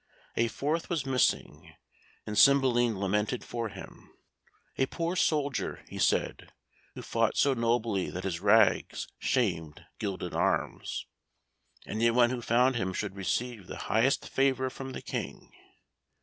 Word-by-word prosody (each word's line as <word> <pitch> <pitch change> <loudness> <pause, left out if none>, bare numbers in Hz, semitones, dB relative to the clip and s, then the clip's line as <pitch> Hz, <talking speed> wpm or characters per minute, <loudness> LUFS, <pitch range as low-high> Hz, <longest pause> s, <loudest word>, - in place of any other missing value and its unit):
A 115 - +2
fourth 150 +8 -2
was 165 -6 -1
missing, 130 -2 0 0.5
and 105 - -4
Cymbeline 120 -4 +4
lamented 105 +5 0
for 115 -2 -4
him - - -12 0.6
a 135 - +1
poor 170 +5 -2
soldier, 145 -6 0
he - - -8
said, - - 0 0.4
who - - -7
fought - - 0
so 140 - +4
nobly 115 -5 0
that 90 - -6
his 90 -4 -2
rags 105 +4 +3
shamed 80 -3 -1
gilded 95 -4 -4
arms. - - -1 0.8
Anyone 115 +2 +3
who 125 -2 -3
found 125 +2 +3
him 95 -4 -2
should 100 0 -4
receive 100 +2 -3
the - - -7
highest 120 +5 +2
favour 130 -1 +1
from 135 0 -7
the - - -7
King. - - -6
120 Hz, 135 wpm, -29 LUFS, 105-135 Hz, 0.8 s, Cymbeline